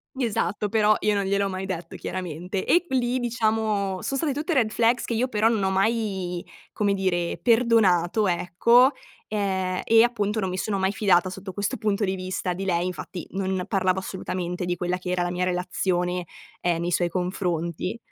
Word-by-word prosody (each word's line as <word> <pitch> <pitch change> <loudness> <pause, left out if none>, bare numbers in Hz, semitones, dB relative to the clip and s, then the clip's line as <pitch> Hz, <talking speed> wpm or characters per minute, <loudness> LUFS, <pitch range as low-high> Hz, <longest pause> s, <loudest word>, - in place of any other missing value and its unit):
Esatto, 210 -5 -1
però 215 0 +3
io 210 -1 +1
non 200 - +1
gliel'ho 200 +1 +1
mai 190 0 -4
detto 175 -3 -5
chiaramente. 180 +1 -4
E 350 - +4
q - - -23
lì 250 -1 +1
diciamo 215 -5 0
son 275 - -2
state 285 0 0
tutte 315 +5 -2
red 235 -7 +3
flags 235 +2 +2
che - - -3
io 245 +3 0
però 215 -1 +2
non 225 -3 +1
ho 190 - +2
mai, 190 -4 -1 0.3
come 205 -1 +1
dire, 180 -3 -1
perdonato, 220 -5 +3
ecco, 235 +9 +4 0.4
e 190 -3 -1
e 225 0 +6
appunto 215 -3 0
non 190 - -1
mi 185 - -3
sono 200 +1 -1
mai 190 0 +1
fidata 190 -3 +3
sotto 190 +1 -8
questo 205 +1 -2
punto 210 0 0
di 190 -1 0
vista 185 0 -3
di 190 +2 -5
lei. 175 -1 +1
Infatti, 180 0 -6
non 190 -1 -1
parlavo 190 -2 +1
assolutamente 180 -2 -4
di 175 0 -1
quella 180 +1 -1
che 180 0 -5
era 180 -1 +1
la 175 - -2
mia 180 +1 -1
relazione, 180 0 -1 0.3
ehm, 170 -1 0
nei 175 +1 -1
suoi 175 0 +2
confronti. 180 +1 -2
190 Hz, 190 wpm, -25 LUFS, 180-215 Hz, 0.4 s, e